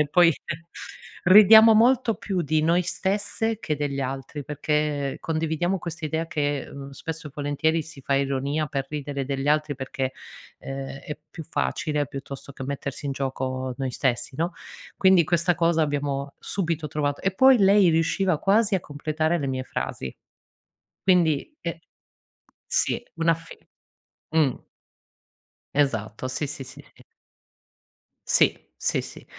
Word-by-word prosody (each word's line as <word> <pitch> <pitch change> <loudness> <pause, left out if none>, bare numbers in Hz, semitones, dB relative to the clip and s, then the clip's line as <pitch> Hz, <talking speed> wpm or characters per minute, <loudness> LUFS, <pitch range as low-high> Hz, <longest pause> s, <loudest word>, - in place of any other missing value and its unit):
e 150 - +2
poi 170 +1 +5 0.9
ridiamo 220 +4 +9
molto 235 0 +4
più 185 -4 -2
di 155 +1 +1
noi 170 +3 +3
stesse 205 +4 -1
che 155 -8 -2
degli 140 -1 -2
altri, 135 +2 -4
perché 150 -1 -1
condividiamo 165 +3 -1
questa 170 -1 -6
idea 160 +2 -1
che, 145 -3 -2
mhmm, 140 0 -8
spesso 160 +3 -7
e - - -14
volentieri 150 +3 0
si 155 -2 -12
fa 140 - 0
ironia 140 +2 0
per 135 -2 -3
ridere 145 -2 -4
degli 135 +1 -2
altri 150 -1 +2
perché, 130 0 -3 0.5
ehm, 135 0 -6
è 150 +1 -7
più 165 - -8
facile 150 -2 -1
piuttosto 140 +1 -8
che 135 - -9
mettersi 140 +1 -5
in 135 - -1
gioco 130 -1 -3
noi 135 -1 -2
stessi, 130 +1 -1
no, 170 +3 -1 0.4
quindi 190 -3 +5
questa 175 +2 +2
cosa 165 -1 +2
l'abbiamo 140 -2 -1
subito 165 -5 -2
trovat 145 -1 -1
e 195 - +2
poi 260 +3 +7
lei 195 -2 +6
riusciva 165 +1 +1
quasi 205 +3 +3
a 185 - -3
completare 155 +3 -1
le 140 - -2
mie 130 -1 -2
frasi. 65 - -4 0.9
Quindi 180 - +2
eh 170 -1 -5 0.9
sì, - - +1
un'affi 165 0 -1 0.7
mh. 155 -5 +1 1.1
Esatto, 130 -4 0
sì, 135 +4 -2
sì, 140 -1 -6
sì, 130 +1 -12
sì. - - -19 1.3
Sì, - - +4 0.2
sì, - - 0
sì. - - -11
150 Hz, 140 wpm, -25 LUFS, 140-170 Hz, 1.3 s, ridiamo